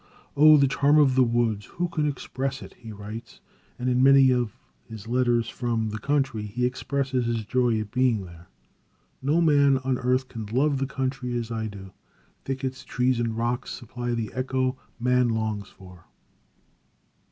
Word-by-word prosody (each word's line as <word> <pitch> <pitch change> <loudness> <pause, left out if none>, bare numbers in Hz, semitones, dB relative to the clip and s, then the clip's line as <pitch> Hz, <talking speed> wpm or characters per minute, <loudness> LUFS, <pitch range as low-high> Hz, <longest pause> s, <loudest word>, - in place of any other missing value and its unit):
"Oh, 155 +1 +8
the 140 -1 +4
charm 145 +2 +3
of 145 -3 +5
the 130 - +4
woods, 115 -3 0
who 175 +1 -3
can 155 -3 -1
express 135 -1 -4
it!" - - -12
he 115 - -11
writes, 105 +3 -9 0.4
and 125 - -3
in 125 0 +2
many 135 -1 +6
of 120 -2 -1 0.3
his 110 -2 -9
letters 120 -1 +1
from 115 -3 -2
the 110 - -5
country, 135 -3 0
he 105 +4 -2
expresses 130 0 -1
his 115 -2 -2
joy 125 -2 +1
at 110 -1 -6
being 125 -5 +1
there. 85 0 -14 0.7
"No 150 +6 +2
man 140 -4 +4
on 130 -1 0
earth 130 +1 +1
can 110 -4 -7
love 135 +5 +1
the 135 - -1
country 130 -2 -3
as 115 -1 -4
I 110 -1 -2
do. 95 -2 -10 0.5
Thickets, 130 0 -4
trees 125 -1 0
and 115 -1 -1
rocks 120 +2 -2
supply 120 0 -4
the 115 -2 -3
echo 130 +1 -1 0.2
man 125 0 +2
longs 110 -3 -2
for." 90 -3 -16
125 Hz, 170 wpm, -25 LUFS, 110-135 Hz, 0.7 s, Oh